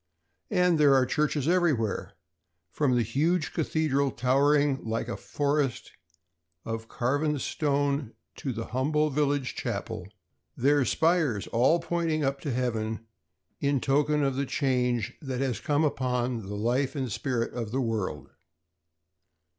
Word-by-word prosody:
And 180 Hz, -3 st, +3 dB
there 145 Hz, -2 st, +6 dB
are 130 Hz, -1 st, +4 dB
churches 150 Hz, +1 st, 0 dB
everywhere, 160 Hz, -, +1 dB, 0.6 s
from 140 Hz, -4 st, +1 dB
the 120 Hz, -, +3 dB
huge 150 Hz, -, 0 dB
cathedral 150 Hz, -4 st, +1 dB
towering 140 Hz, +3 st, +2 dB
like 115 Hz, 0 st, -2 dB
a 120 Hz, -, -3 dB
forest 145 Hz, -3 st, -1 dB, 0.7 s
of 115 Hz, 0 st, -4 dB
carven 145 Hz, +6 st, 0 dB
stone 140 Hz, -3 st, -1 dB, 0.2 s
to 135 Hz, -, -3 dB
the 115 Hz, -1 st, -4 dB
humble 150 Hz, +4 st, +1 dB
village 145 Hz, -2 st, 0 dB
chapel -, -, -4 dB
or -, -, -7 dB
wayside -, -, -17 dB, 0.4 s
shrine, -, -, -10 dB
their 145 Hz, -1 st, +4 dB
spires 160 Hz, -, +1 dB
all 125 Hz, +9 st, +3 dB
pointing 165 Hz, -3 st, -1 dB
up 135 Hz, 0 st, -1 dB
to 145 Hz, -, -3 dB
heaven 115 Hz, -3 st, -2 dB, 0.5 s
in 140 Hz, -1 st, +1 dB
token 145 Hz, +3 st, +2 dB
of 135 Hz, -1 st, +1 dB
the 140 Hz, 0 st, -1 dB
change 125 Hz, -6 st, 0 dB
that 130 Hz, -4 st, -4 dB
has 130 Hz, -3 st, -1 dB
come 145 Hz, +1 st, +1 dB
upon 125 Hz, -6 st, -1 dB
the 105 Hz, -, -5 dB
life 125 Hz, +7 st, 0 dB
and 130 Hz, -4 st, -2 dB
spirit 120 Hz, +2 st, -2 dB
of 115 Hz, -3 st, -4 dB
the 130 Hz, +5 st, -1 dB
world. 110 Hz, -10 st, -3 dB
135 Hz, 145 wpm, -28 LUFS, 120-150 Hz, 0.7 s, there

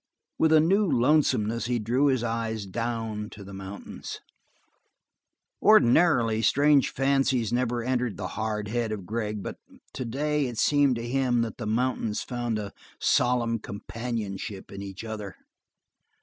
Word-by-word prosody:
With 160 Hz, -, +4 dB
a 160 Hz, -, +7 dB
new 195 Hz, +6 st, +3 dB
lonesomeness 120 Hz, -4 st, +2 dB
he 125 Hz, -1 st, +1 dB
drew 120 Hz, +6 st, +1 dB
his 130 Hz, -4 st, +2 dB
eyes 115 Hz, -2 st, -2 dB
down 110 Hz, 0 st, -3 dB
to 100 Hz, -, -11 dB
the 100 Hz, 0 st, -10 dB
mountains. 95 Hz, +1 st, -8 dB, 1.4 s
Ordinarily, 125 Hz, -, +5 dB
strange 145 Hz, +3 st, +4 dB
fancies 135 Hz, -4 st, +1 dB
never 120 Hz, -1 st, 0 dB
entered 125 Hz, -3 st, -1 dB
the 95 Hz, -2 st, -4 dB
hard 105 Hz, -1 st, -3 dB
head 115 Hz, -1 st, -1 dB
of 100 Hz, -4 st, -5 dB
Gregg, 105 Hz, -1 st, -3 dB
but -, -, -6 dB, 0.4 s
today 140 Hz, +4 st, -1 dB
it 120 Hz, -2 st, -6 dB
seemed 145 Hz, 0 st, +3 dB
to 115 Hz, 0 st, -4 dB
him 125 Hz, -2 st, +1 dB
that 115 Hz, -, -5 dB
the 115 Hz, -, -5 dB
mountains 115 Hz, -1 st, 0 dB
found 120 Hz, -3 st, -2 dB
a 100 Hz, -2 st, -5 dB, 0.3 s
solemn 120 Hz, -2 st, +2 dB
companionship 105 Hz, -2 st, -5 dB
in 100 Hz, -, -7 dB
each 100 Hz, +1 st, -7 dB
other. 105 Hz, -4 st, -6 dB
115 Hz, 140 wpm, -27 LUFS, 105-130 Hz, 1.4 s, a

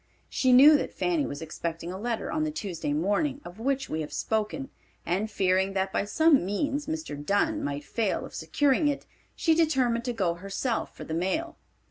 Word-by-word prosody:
She 260 Hz, -, +2 dB
knew 285 Hz, +5 st, +9 dB
that -, -, -4 dB
Fanny 335 Hz, -5 st, 0 dB
was 145 Hz, +3 st, -6 dB
expecting 165 Hz, +1 st, -5 dB
a 190 Hz, -, -6 dB
letter 235 Hz, +4 st, -2 dB
on 310 Hz, 0 st, 0 dB
the 310 Hz, -, 0 dB
Tuesday 185 Hz, -, -4 dB
morning 205 Hz, -, 0 dB
of 175 Hz, +4 st, -10 dB
which 270 Hz, +3 st, 0 dB
we 160 Hz, -, -2 dB
have 150 Hz, -, -6 dB
spoken, 220 Hz, +5 st, -2 dB, 0.3 s
and 195 Hz, +6 st, 0 dB
fearing 190 Hz, -1 st, +1 dB
that 190 Hz, 0 st, -1 dB
by -, -, 0 dB
some 315 Hz, -, +4 dB
means 275 Hz, +10 st, -1 dB
Mr. 315 Hz, -, -4 dB
Dunn 305 Hz, -, +1 dB
might 145 Hz, +1 st, -3 dB
fail 220 Hz, +2 st, -1 dB
of -, -, -12 dB
securing 275 Hz, -, +2 dB
it, 285 Hz, -1 st, -1 dB, 0.3 s
she 325 Hz, -, +3 dB
determined 260 Hz, -8 st, +2 dB
to 245 Hz, -, 0 dB
go 190 Hz, -7 st, 0 dB
herself 195 Hz, +7 st, -3 dB
for -, -, -7 dB
the 160 Hz, -, -6 dB
mail. 190 Hz, -, -1 dB
220 Hz, 190 wpm, -27 LUFS, 185-290 Hz, 0.3 s, knew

